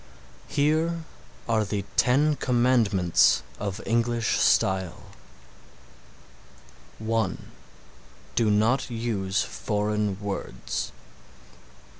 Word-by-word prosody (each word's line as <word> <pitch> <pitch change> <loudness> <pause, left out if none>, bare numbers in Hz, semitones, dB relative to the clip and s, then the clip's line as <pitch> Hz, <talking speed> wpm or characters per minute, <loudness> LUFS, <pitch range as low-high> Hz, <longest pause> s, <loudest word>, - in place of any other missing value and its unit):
Here 160 +3 +1 0.4
are 115 -2 +2
the 100 -1 -3
Ten 145 +5 +3
Commandments 120 - +3 0.2
of 100 0 -3
English 115 0 +1
style: 95 -3 +2 1.9
(1) 110 -3 -2 0.8
Do 115 -2 +2
not 110 +6 +2
use 110 -4 -1
foreign 105 -2 -2
words. 100 -11 -4
110 Hz, 70 wpm, -26 LUFS, 100-120 Hz, 1.9 s, Ten